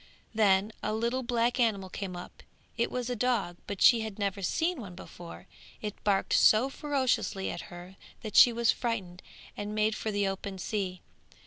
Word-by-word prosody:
Then 205 -1 +3
a 215 - -1
little 235 +3 0
black 240 +1 0
animal 210 -5 +1
came 185 0 -6
up; 175 - -10 0.3
it 235 - 0
was 250 -1 -3
a 250 - -2
dog, 215 -7 0
but 200 -2 -2
she 235 - +7
had 220 -2 -5
never 200 -1 -2
seen 320 - 0
one 185 -5 -9
before; 175 -1 -11 0.3
it 210 -1 -6
barked 200 -2 +1
so 240 +5 +5
furiously 265 -9 -1
at 170 - -7
her 175 +2 -11 0.3
that 215 - -6
she 245 - +9
was 235 0 +3
frightened 195 -7 -3 0.3
and 205 +1 -5
made 215 0 +2
for 220 - -3
the 205 -1 0
open 195 0 -4
sea. 185 -2 -3
210 Hz, 180 wpm, -29 LUFS, 195-235 Hz, 0.3 s, she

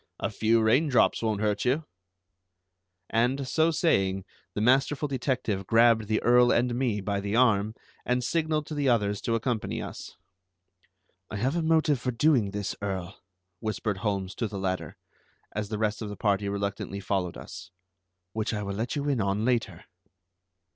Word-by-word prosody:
A 100 - -2
few 110 +2 +2
rain 125 +9 +4
drops 125 - +3
won't 110 -2 -1
hurt 105 -1 0
you." 140 +6 +1 1.3
And, 125 +4 +1
so 160 +4 +3
saying, 95 - +1 0.3
the - - -1
masterful 135 +5 +2
detective 125 -8 -2
grabbed 115 0 +4
the 110 0 +1
Earl 120 0 +5
and 120 0 +2
me 120 -5 0
by 100 +1 -1
the 100 +1 -2
arm 110 -3 +3 0.3
and 125 0 0
signalled 155 +2 0
to 155 - -7
the 145 -2 +1
others 105 -4 +1
to 115 - 0
accompany 115 -1 -2
us. - - -8 1.1
"I - - -6
have 130 +9 0
a 170 - +1
motive 160 -4 +2
for 130 - -1
doing 125 -3 +3
this, 100 -1 -3
Earl," 95 -2 -4 0.4
whispered 110 -2 -2
Holmes 100 -1 -2
to 115 - -1
the 105 -1 -6
latter, 95 -1 -3 0.5
as 105 -1 -4
the 110 - -2
rest 105 0 -1
of 105 - -4
the 105 - -7
party 100 -1 +1
reluctantly 100 0 -3
followed 95 -3 -2
us, 95 +1 -9 0.6
"which 110 0 -2
I 105 - -3
will 100 0 -3
let 115 +8 -3
you 145 0 -2
in 135 -6 +1
on 100 +2 0
later." 115 -8 -1
110 Hz, 170 wpm, -27 LUFS, 100-125 Hz, 1.3 s, Earl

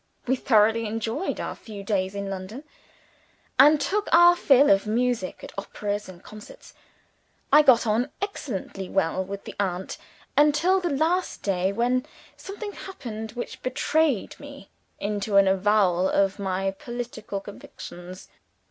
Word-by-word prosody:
We 260 +1 +2
thoroughly 225 -2 +3
enjoyed 225 - -3
our - - -3
few 205 -3 -10
days 195 -1 -1
in 200 0 -4
London 195 +7 -6 1.0
and 295 +3 +7
took 405 +9 -1
our 345 +1 +7
fill 280 -4 +5
of 195 +2 +3
music 235 -3 -1
at - - -9
operas 205 0 -4
and 180 -1 -13
concerts. 215 - -13 0.8
I 300 - +9
got 260 -6 +5
on 230 +5 +1
excellently 220 - -5
well 190 -1 0
with 200 +1 -7
the - - -8
aunt 190 -2 -3 0.4
until 300 +6 +4
the 355 -2 -2
last 325 +6 0
day, 190 -1 0
when 245 +4 +1 0.3
something 410 +1 -7
happened 225 - -8
which 250 +1 -7
betrayed 275 -1 0
me 280 -7 -12 0.3
into 205 0 -1
an 195 -1 +6
avowal 190 -2 +2
of 195 +1 +1
my 195 0 -1
political 235 -1 -6
convictions. 185 -2 -11
220 Hz, 140 wpm, -25 LUFS, 195-280 Hz, 1.0 s, I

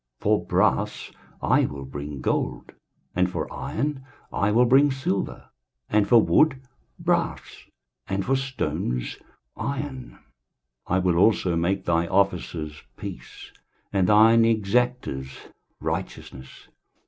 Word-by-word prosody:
23:060:017 - - -18
For - - +2
brass - - +1 0.3
I - - +3
will 70 -2 -6
bring 70 +1 -7
gold, - - -2 0.4
and 90 0 +2
for - - -4
iron 140 +3 -3 0.3
I 100 - +1
will 120 +3 +5
bring 135 +4 +5
silver, 130 -7 -3 0.4
and 105 -1 +3
for 120 +3 +7
wood 140 +4 +3 0.4
brass, - - -2 0.4
and 95 0 -2
for 135 - +2
stones 130 - -3 0.4
iron: 135 -2 -5 0.7
I 90 - +1
will 90 -2 +1
also 95 -2 +3
make 85 +4 0
thy 85 0 +1
officers 85 -5 -1 0.2
peace, - - -9 0.4
and 95 -2 +2
thine 110 +2 +6
exactors 110 - 0 0.4
righteousness. 65 0 -6
100 Hz, 115 wpm, -25 LUFS, 85-125 Hz, 0.7 s, for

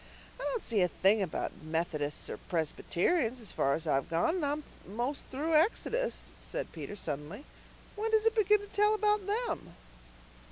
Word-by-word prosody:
"I - - -5
don't 485 -3 -1
see 215 -4 +2
a 180 - +5
thing 200 +4 +3
about 185 -5 -3
Methodists 155 -2 -2
or - - -5
Presbyterians, 220 - 0
as 220 -5 -6
far 140 0 +2
as 165 - -4
I've 135 -4 +1
gone, 170 - +2
and 345 - -2
I'm 295 +2 -1 0.2
most 240 +8 -3
through 300 +5 -1
Exodus," 460 +9 +1
said - - -4
Peter 160 +4 -6
suddenly. 160 - -5 0.5
"When 435 +2 -1
does 440 0 +3
it 450 - +5
begin 420 -2 +4
to 410 - -9
tell 420 +2 +3
about 420 -2 +2
them?" 460 +4 -2
265 Hz, 170 wpm, -32 LUFS, -, 0.5 s, a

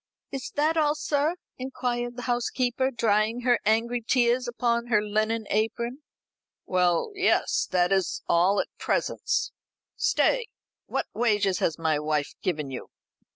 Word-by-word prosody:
"Is 270 -1 -5
that 310 +3 +2
all, 300 -1 +3
sir?" 300 +2 0 0.2
inquired 245 -2 -3
the 245 - -6
housekeeper, 245 +1 0
drying 225 -1 +1
her 245 -1 +3
angry 235 +3 +2
tears 245 +1 +2
upon 235 0 0
her 220 -3 +3
linen 215 +1 0
apron. 235 +5 -1 0.6
"Well, 180 - +1
yes, 385 -1 +2
that 180 0 +2
is 190 -3 0
all 180 +4 +3
at - - -3
present. - - -2 0.7
Stay. - - +2 0.4
What - - -1
wages 210 -5 +1
has 160 - 0
my 160 -2 +1
wife 150 -1 -1
given 150 -6 -2
you?" 130 - -7
235 Hz, 135 wpm, -26 LUFS, 195-250 Hz, 0.7 s, all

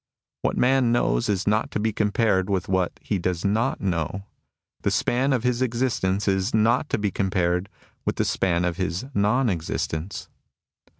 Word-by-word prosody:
"What - - -1
man 130 -1 +3
knows 120 -1 +1
is 95 -2 0
not 105 +1 +1
to - - -3
be 110 +1 0
compared 105 -2 +1
with 95 -3 0
what 95 -2 +1
he 100 - -1
does 90 0 -2
not 110 +6 +1
know. 90 0 -2 0.6
The - - +1
span 130 +3 +1
of 125 -3 +1
his 125 0 +1
existence 115 -6 0
is 95 +1 +1
not 115 +7 +2
to - - +1
be 105 -2 -1
compared 90 -1 0 0.3
with - - -1
the - - 0
span 90 -2 +1
of 90 -1 -1
his 95 +4 -2
non 120 +5 +2
existence. 85 -1 -3
100 Hz, 170 wpm, -24 LUFS, 95-115 Hz, 0.6 s, man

